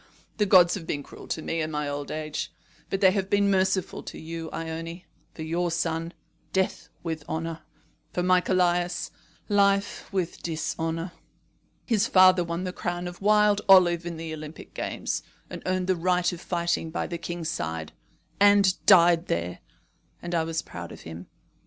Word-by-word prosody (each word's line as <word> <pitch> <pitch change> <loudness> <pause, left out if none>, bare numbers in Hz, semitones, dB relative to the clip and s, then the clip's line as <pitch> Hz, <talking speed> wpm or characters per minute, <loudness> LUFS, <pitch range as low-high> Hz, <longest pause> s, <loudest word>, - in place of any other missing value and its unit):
The 210 -1 +2
gods 180 -3 +7
have 170 -5 -5
been 145 - -2
cruel - - -12
to 160 - -3
me 165 0 -1
in 155 - -2
my 150 -1 -2
old 145 0 -4
age; 155 -1 -4 0.4
but 195 - -2
they 190 -2 +7
have 195 -1 -1
been 200 0 +3
merciful 190 -1 +1
to - - -9
you, 165 0 -6
Ione. 165 +2 -5 0.3
For 160 - -6
your 170 +2 -1
son, 165 0 -2 0.4
death 190 0 -1
with 160 -3 -4
honour. 165 0 -3 0.5
For 180 - -1
my 180 0 +4
Callias, 175 -1 +1 0.4
life 200 -1 +1
with 185 -3 -2
dishonour. 165 +1 -3 0.7
His 225 -2 +2
father 185 -1 +6
won 170 +1 -3
the 180 -1 -3
crown 175 0 -3
of 175 +1 -9
wild 210 0 +4
olive 175 -3 +7
in 170 -1 -5
the 160 -1 -5
Olympic 155 0 -9
games, - - -3 0.3
and - - -6
earned 185 0 0
the 185 0 +2
right 180 +1 +1
of 175 - -8
fighting 170 -2 -1
by 165 - -2
the 170 -1 -5
king's 170 -1 -4
side, 80 - -4 0.5
and 200 -2 +5
died 175 -3 +6
there; 85 +1 -2 0.6
and 175 0 -6
I 165 -1 +2
was 160 0 -2
proud - - -8
of - - -11
him. 80 +2 -9
175 Hz, 170 wpm, -26 LUFS, 160-185 Hz, 0.7 s, gods